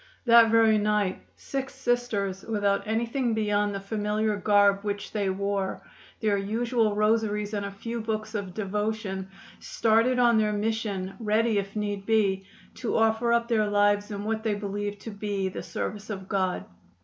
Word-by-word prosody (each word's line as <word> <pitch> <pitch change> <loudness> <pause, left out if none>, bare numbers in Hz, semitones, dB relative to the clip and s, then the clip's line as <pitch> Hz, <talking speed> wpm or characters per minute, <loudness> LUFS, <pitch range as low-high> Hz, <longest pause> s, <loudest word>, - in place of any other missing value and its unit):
That 235 -1 +7
very 220 -1 +5
night 210 -2 0
six 270 -1 -5
Sisters, 245 -7 -1
without 205 -2 0
anything 230 +2 0
beyond 205 -1 +1
the - - -2
familiar 210 +1 -1
garb 200 0 +4
which 205 0 -4
they 205 -3 0
wore, 195 0 -2 0.4
their 210 -2 +2
usual 225 +1 0
rosaries 210 -1 +1
and 205 -1 -1
a - - -5
few 230 +4 -5
books 215 0 -3
of 195 -4 -4
devotion, 210 -2 -3 0.3
started 230 +3 +2
on 240 -2 +4
their 210 -1 +1
mission, 205 -3 -2
ready, 220 0 +2
if 195 +1 -6
need 205 -2 -3
be, 200 -4 +2 0.3
to 240 - -1
offer 225 +1 +2
up 235 0 +2
their 220 -3 +2
lives 205 0 +2
in 205 -1 -5
what 220 +1 -1
they 220 -2 0
believed 205 0 -4
to 225 - -7
be 200 -2 -2
the - - -6
service 210 +1 -5
of 190 -3 -5
God. 190 -2 -1
210 Hz, 160 wpm, -27 LUFS, 200-225 Hz, 0.4 s, That